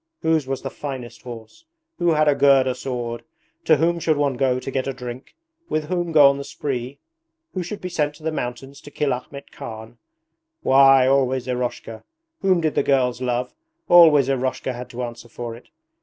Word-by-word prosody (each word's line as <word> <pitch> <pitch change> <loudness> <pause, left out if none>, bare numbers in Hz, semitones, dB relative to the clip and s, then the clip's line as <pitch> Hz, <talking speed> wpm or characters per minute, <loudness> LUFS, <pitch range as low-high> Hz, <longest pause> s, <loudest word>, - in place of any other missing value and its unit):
Whose 160 -4 +1
was 135 0 -3
the - - -4
finest 130 -4 -7
horse? 120 - -11 0.3
Who 175 -1 +2
had 155 0 +2
a 145 - +5
Gurda 135 -2 +4
sword? 120 -3 -5 0.4
To 155 - +5
whom 170 +3 +1
should 160 -2 +1
one 145 -2 +1
go 125 0 +1
to 135 - -6
get 130 0 -2
a 135 - -2
drink? 125 0 -9 0.3
With 155 0 -2
whom 175 -2 -1
go 150 -3 +7
on 140 0 +2
the - - -4
spree? 135 -1 -5 0.6
Who 185 - -2
should 180 +4 -6
be 180 - -4
sent 150 -4 -1
to 155 - -17
the 160 - -1
mountains 135 0 -6
to - - -12
kill 145 -1 -1
Ahmet 140 +3 -8
Khan? 110 +1 -9 0.6
Why, 135 -1 +6
always 130 -1 +1
Eroshka! 125 -3 -4 0.4
Whom 185 -3 +3
did 155 -2 0
the - - +2
girls 130 -3 +1
love? 125 0 -2 0.4
Always 160 -6 +7
Eroshka 130 -1 -1
had 125 +1 -8
to 125 +1 -5
answer 120 0 -8
for 115 0 -6
it. 120 - -16
135 Hz, 190 wpm, -22 LUFS, 125-150 Hz, 0.6 s, go